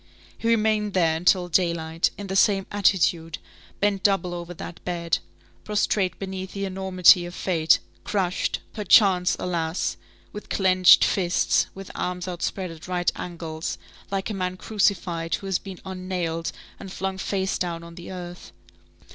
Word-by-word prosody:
He 230 - -4
remained 215 -2 +2
there 165 -3 +3
until 180 +2 +3
daylight, 165 -2 +1
in 205 - -6
the 190 0 -4
same 195 -1 +3
attitude, 175 -5 +2 0.4
bent 200 -1 +1
double 190 -3 +1
over 175 0 -6
that 170 - -9
bed, 170 -2 -1 0.4
prostrate 205 -3 0
beneath 190 -1 -6
the 200 0 -3
enormity 185 -2 +4
of 175 - -9
fate, 165 -4 +3 0.3
crushed, 190 -3 -1
perchance, 195 -3 +4
alas! 170 -1 -2 0.4
with 210 - -9
clenched 185 -2 +6
fists, 180 -3 +2
with 195 0 -9
arms 180 0 -3
outspread 180 +1 -3
at 165 +1 -11
right 180 -1 0
angles, 165 -2 -5 0.3
like 195 +2 -2
a - - -3
man 185 -1 -3
crucified 180 -6 0
who - - -9
has 190 -2 0
been 190 -2 -9
un 185 -1 -7
nailed, 165 -3 -2 0.3
and 195 -2 -9
flung 190 0 -3
face 190 -1 -1
down 170 -2 -3
on 170 0 -11
the 175 +2 -9
earth. 175 -1 -8
185 Hz, 150 wpm, -25 LUFS, 175-195 Hz, 0.4 s, clenched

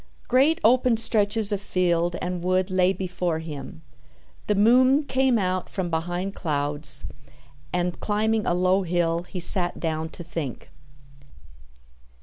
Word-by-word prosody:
Great 275 +6 +3
open 245 0 +3
stretches 220 -1 +3
of 205 -1 -2
field 175 -3 0
and 180 -1 -3
wood 185 +1 0
lay 185 0 +3
before 180 -3 -3
him. 150 - -8 0.6
The 210 - +1
moon 255 +7 +4
came 265 -3 +1
out 185 -2 -2
from 180 -3 -4
behind 175 +4 -3
clouds, 145 -3 -1 0.7
and, 180 0 -2
climbing 215 +1 0
a 175 - +1
low 185 +2 +2
hill, 170 -2 0
he 180 +1 -8
sat 175 0 +2
down 160 -1 -3
to 175 - -10
think. 160 -6 -6
185 Hz, 130 wpm, -24 LUFS, 170-210 Hz, 0.7 s, moon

